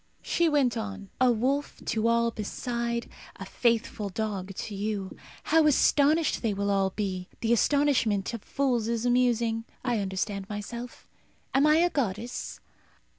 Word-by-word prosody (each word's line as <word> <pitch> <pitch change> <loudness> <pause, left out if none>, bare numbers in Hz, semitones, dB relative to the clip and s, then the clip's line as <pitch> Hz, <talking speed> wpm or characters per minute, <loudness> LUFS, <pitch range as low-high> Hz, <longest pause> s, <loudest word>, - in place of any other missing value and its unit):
She 340 -1 +2
went 275 -6 +2
on, 205 -3 -6
"A 255 -1 +6
wolf 265 +5 -1
to 225 0 0
all 235 0 +2
beside; 235 +2 -3 0.3
a - - -8
faithful 230 -3 0
dog 195 -2 -4
to 210 - -5
you. 200 -1 -3 0.3
How 320 0 +4
astonished 300 +2 +3
they 220 -4 0
will 200 0 0
all 195 -1 +2
be! 185 -2 -3
The 230 0 +2
astonishment 235 -6 +2
of 230 - -5
fools 250 -5 0
is 235 0 -1
amusing. 235 -2 +2 0.2
I 240 -3 +1
understand 195 0 -3
myself. 235 +4 -7 0.5
Am 275 +3 +4
I 305 - +6
a 345 +2 +3
goddess? 235 -2 -3
230 Hz, 145 wpm, -28 LUFS, 205-255 Hz, 0.5 s, A